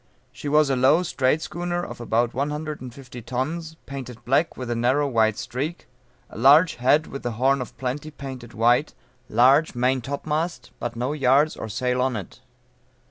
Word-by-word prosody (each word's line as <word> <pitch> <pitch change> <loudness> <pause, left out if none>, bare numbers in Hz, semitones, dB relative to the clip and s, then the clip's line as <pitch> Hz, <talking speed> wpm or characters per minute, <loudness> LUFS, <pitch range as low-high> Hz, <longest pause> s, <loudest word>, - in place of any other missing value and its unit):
She 125 +4 -6
was 150 -1 +4
a - - +2
low 135 +7 +4
strait 150 -1 +1
schooner 175 0 -3
of - - -9
about 120 +1 +1
one 140 +3 -1
hundred 150 0 -5
and 130 -1 -7
fifty 125 -1 -11
tons, 155 +8 -4
painted 130 -4 -8
black 140 +6 +1
with 125 -2 -4
a - - 0
narrow 130 +5 +2
white 110 -4 +2
streak, 150 +8 -4 0.5
a - - -9
large 145 +8 +6
head 145 +6 +3
with 140 - -7
the 120 - -3
horn 135 +4 +2
of 125 - -8
plenty 135 +4 -4
painted 130 -5 -9
white, 120 +6 +2 0.3
large 135 +7 +4
maintopmast 140 +7 -1
but 120 -1 -4
no 125 +5 -2
yards 140 +1 +3
or 110 - -6
sail 125 +4 -1
on 130 -1 0
it. 100 -5 -7
130 Hz, 180 wpm, -24 LUFS, 120-150 Hz, 0.5 s, large